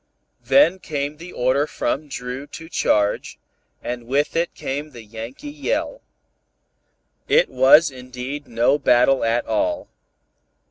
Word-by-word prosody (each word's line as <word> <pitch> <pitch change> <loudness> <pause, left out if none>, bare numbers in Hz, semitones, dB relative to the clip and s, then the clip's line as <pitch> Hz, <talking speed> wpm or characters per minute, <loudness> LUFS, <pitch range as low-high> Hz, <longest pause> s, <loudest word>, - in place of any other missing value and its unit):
Then 190 -10 +4
came 145 -2 -4
the 170 +3 -10
order 130 +4 +1
from 145 +3 -2
Dru 130 +1 -6
to 160 +2 -10
charge, 105 -10 0 0.5
and 120 -1 -5
with 145 +5 0
it 170 +1 -1
came 145 +3 -4
the 120 -5 -12
Yankee 115 - -8
yell. 390 - -3 1.3
It 485 -2 +4
was 150 - +6
indeed 130 +3 -7
no 120 +5 +2
battle 130 0 +4
at 115 +1 +1
all. 305 -2 -1
140 Hz, 125 wpm, -22 LUFS, 125-165 Hz, 1.3 s, was